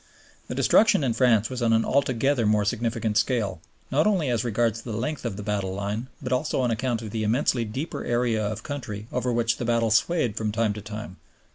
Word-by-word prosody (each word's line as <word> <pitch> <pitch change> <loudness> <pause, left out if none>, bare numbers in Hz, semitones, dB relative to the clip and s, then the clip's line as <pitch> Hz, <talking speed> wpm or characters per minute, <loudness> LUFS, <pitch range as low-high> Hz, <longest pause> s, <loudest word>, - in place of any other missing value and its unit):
The - - -5
destruction 215 -8 +4
in 125 -4 +1
France 115 -3 +3
was 130 -1 -4
on 115 -1 +3
an 115 0 +3
altogether 130 -2 +1
more 105 -1 +3
significant 110 0 0
scale, 105 -7 -1 0.3
not 150 +7 +3
only 185 -10 +1
as 115 -1 0
regards 115 -1 0
the 115 - -6
length 140 +4 -3
of 115 -4 -2
the 105 - -6
battle 100 -2 -2
line, 100 +5 -3
but 130 -2 -3
also 145 +4 0
on 125 -2 +1
account 120 0 -1
of 110 - -6
the 110 0 -2
immensely 115 +2 +1
deeper 130 +10 -4
area 120 -2 0
of 105 0 -3
country 110 -8 -5
over 125 0 -1
which 115 -1 +1
the 120 - -3
battle 115 -1 +1
swayed 115 0 +2
from 110 -1 -1
time 110 -1 +1
to 105 - -7
time. 105 -2 -8
115 Hz, 215 wpm, -25 LUFS, 105-125 Hz, 0.3 s, destruction